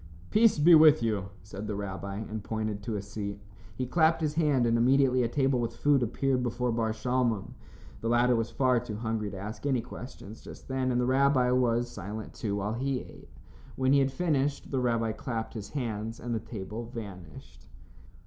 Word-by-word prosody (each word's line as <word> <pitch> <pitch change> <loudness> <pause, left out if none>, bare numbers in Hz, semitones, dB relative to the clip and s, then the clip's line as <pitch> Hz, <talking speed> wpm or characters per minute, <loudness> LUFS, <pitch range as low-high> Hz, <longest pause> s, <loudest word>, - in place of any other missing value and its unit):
"Peace 225 -2 +5
be 160 +4 +6
with 155 -4 +7
you," 105 -4 -1
said 100 +1 -7
the 105 - -2
rabbi, 100 0 -5
and 110 0 -5
pointed 110 -2 -3
to 110 +1 -3
a 100 - -3
seat. 100 0 -5 0.4
He 130 - -2
clapped 160 +4 +3
his 155 -2 -1
hand 150 -6 +2
and 115 0 +2
immediately 130 +2 +4
a 120 - +2
table 135 +1 +1
with 115 -1 -2
food 140 +2 +3
appeared 130 +2 0
before 120 0 -1
Bar 115 -1 0
Shalmon. 115 -2 -1 0.5
The 115 - -2
latter 120 +1 +4
was 115 0 -1
far 130 -2 +2
too 115 -3 -6
hungry 110 -1 -2
to 100 - -8
ask 105 +4 -7
any 130 -4 +2
questions 115 -3 -10
just - - -12
then, 130 -1 0
and 120 - +1
the 125 - +2
rabbi 130 -1 +3
was 120 -1 +2
silent, 110 -2 -7
too, 100 -2 -3
while 100 +2 -2
he 130 +2 -1
ate. - - -14 0.5
When 130 +1 +2
he 140 - +6
had 135 0 +2
finished, 145 -3 -1
the 135 - +1
rabbi 115 -3 +1
clapped 115 0 -4
his 105 -3 -7
hands 115 -4 -4
and 120 0 -4
the 115 - 0
table 110 +1 -6
vanished. 100 -9 -10
120 Hz, 195 wpm, -29 LUFS, 110-130 Hz, 0.5 s, with